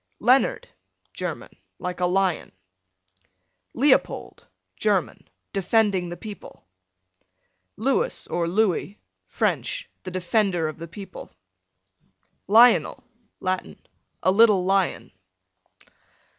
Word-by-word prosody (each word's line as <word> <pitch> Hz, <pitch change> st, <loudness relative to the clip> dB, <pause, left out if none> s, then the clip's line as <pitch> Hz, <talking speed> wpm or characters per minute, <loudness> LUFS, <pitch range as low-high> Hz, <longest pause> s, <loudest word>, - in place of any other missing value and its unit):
Leonard, 260 Hz, -, +3 dB, 0.5 s
German, -, -, -5 dB, 0.3 s
like 180 Hz, 0 st, -5 dB
a 180 Hz, -, +2 dB
lion. 185 Hz, -1 st, 0 dB, 1.2 s
Leopold, 270 Hz, +2 st, +1 dB, 0.3 s
German, -, -, -1 dB, 0.2 s
defending 195 Hz, -2 st, +1 dB
the 175 Hz, -, -7 dB
people. 205 Hz, -, -11 dB, 1.1 s
Lewis 275 Hz, -, 0 dB
or 170 Hz, -1 st, -2 dB
Louis, 200 Hz, +1 st, 0 dB, 0.3 s
French, -, -, -1 dB
the 185 Hz, -, -7 dB
defender 185 Hz, -1 st, 0 dB
of 155 Hz, +1 st, -7 dB
the 165 Hz, -, -7 dB
people. 195 Hz, +4 st, -10 dB, 1.2 s
Lionel, 230 Hz, +4 st, +5 dB, 0.4 s
Latin, 185 Hz, 0 st, -3 dB, 0.4 s
a 185 Hz, -, +4 dB
little 205 Hz, -3 st, +5 dB
lion. 195 Hz, 0 st, 0 dB
195 Hz, 90 wpm, -24 LUFS, 180-225 Hz, 1.2 s, Lionel